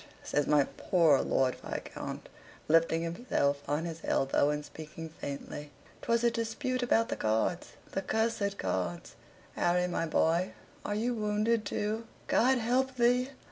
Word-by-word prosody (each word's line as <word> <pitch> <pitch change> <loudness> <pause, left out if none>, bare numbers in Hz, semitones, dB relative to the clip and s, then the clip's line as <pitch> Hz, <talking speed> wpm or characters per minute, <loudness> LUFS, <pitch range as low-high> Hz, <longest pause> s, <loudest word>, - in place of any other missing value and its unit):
says 145 - 0
my 150 -1 +5
poor 165 -6 +4
Lord 130 -1 +1
Viscount, - - -6 0.4
lifting 165 +1 +3
himself 165 - 0
on 150 +3 0
his 165 -1 -6
elbow 135 +1 +2
and 150 0 -2
speaking 160 +1 -8
faintly. 145 -1 -7 0.3
"'Twas 235 0 +1
a 235 - +4
dispute 245 +3 -2
about 230 -2 +2
the - - -1
cards 110 +11 0 0.2
the 195 - -1
cursed 205 -1 0
cards. 90 -2 -2 0.4
Harry 180 +1 +2
my 165 -2 -1
boy, 170 +3 +2 0.3
are 205 - -2
you 235 +4 0
wounded, 215 0 +1
too? 215 +3 -2 0.2
God 260 +2 +4
help 255 +3 +1
thee! 245 +2 +3
180 Hz, 140 wpm, -31 LUFS, 150-230 Hz, 0.4 s, my